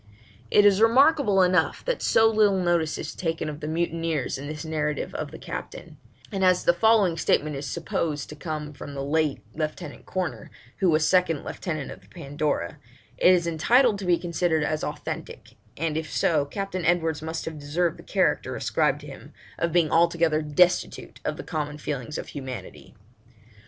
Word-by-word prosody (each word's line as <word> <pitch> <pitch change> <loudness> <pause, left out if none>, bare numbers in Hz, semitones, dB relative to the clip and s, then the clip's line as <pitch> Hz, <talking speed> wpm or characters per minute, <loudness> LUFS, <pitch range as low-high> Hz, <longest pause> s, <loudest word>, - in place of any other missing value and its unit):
It 205 - +5
is 205 0 +5
remarkable 230 -4 +5
enough 180 -2 +1
that - - -1
so 225 - +4
little 215 -3 +3
notice 170 -3 +1
is - - -5
taken 165 -2 -3
of 150 -1 -7
the 150 - -5
mutineers 165 -4 -1
in 140 - -7
this 150 +1 -6
narrative 150 -1 -2
of - - -4
the - - -10
captain; - - -8 0.3
and 195 -2 -1
as 185 -1 +4
the 175 - +4
following 200 -3 +3
statement 150 -1 +1
is 140 +1 -5
supposed 155 -1 -2
to 150 - -8
come 150 -1 -5
from 140 0 -9
the 135 - -3
late 150 0 0
Lieutenant 155 +3 -5
Corner, 185 -3 -3 0.3
who 190 - +2
was 155 -1 +3
second 180 -5 +2
lieutenant 155 -6 -4
of - - -11
the 95 - -22
Pandora, 140 - -3 0.4
it 180 - +6
is 175 -2 +3
entitled 205 - +3
to 195 - -5
be 175 -1 +3
considered 170 -2 0
as 155 +1 -1
authentic, 150 0 -6 0.3
and 160 0 -1
if 160 -1 -3
so, 150 -4 +2
Captain 185 +4 -4
Edwards 165 -3 +1
must 160 +1 -4
have 160 -2 -6
deserved 160 +4 -1
the - - -11
character, - - 0
ascribed - - 0
to - - -11
him, - - -11 0.3
of 170 0 0
being 165 -2 +2
altogether 165 -2 +3
destitute 160 +4 +1
of - - -2
the - - -6
common 150 -2 -4
feelings 145 -1 -4
of - - -6
humanity. 130 -8 -8
160 Hz, 180 wpm, -25 LUFS, 150-180 Hz, 0.4 s, it